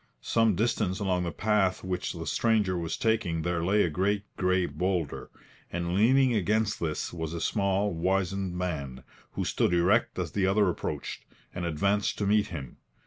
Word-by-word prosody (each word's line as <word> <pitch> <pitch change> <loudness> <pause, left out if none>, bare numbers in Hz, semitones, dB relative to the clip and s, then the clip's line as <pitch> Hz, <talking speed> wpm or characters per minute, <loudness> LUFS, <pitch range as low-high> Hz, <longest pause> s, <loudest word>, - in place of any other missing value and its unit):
Some 115 -3 +2
distance 105 -3 0
along 90 -3 0
the 85 - -2
path 95 +2 +1
which 95 -1 -3
the - - -6
stranger 110 -5 +1
was 85 -2 -3
taking 105 -8 0
there 85 -1 -1
lay 100 +4 +3
a - - +1
great 100 +5 0
grey 90 -1 +2
boulder, 90 -5 -2 0.4
and 85 0 -2
leaning 125 +6 +4
against 110 +1 +1
this 80 0 -3
was 80 -1 -4
a - - -3
small, 100 +1 0
wizened 95 +1 -1
man, 70 -8 -4 0.3
who - - -2
stood 90 - +1
erect 90 +7 +2
as 90 -5 -2
the 95 +1 +1
other 100 0 +3
approached, 85 - -4 0.3
and 90 -1 -4
advanced 100 +6 0
to 100 - -1
meet 105 +1 +3
him. 70 -8 -7
95 Hz, 170 wpm, -28 LUFS, 85-105 Hz, 0.4 s, leaning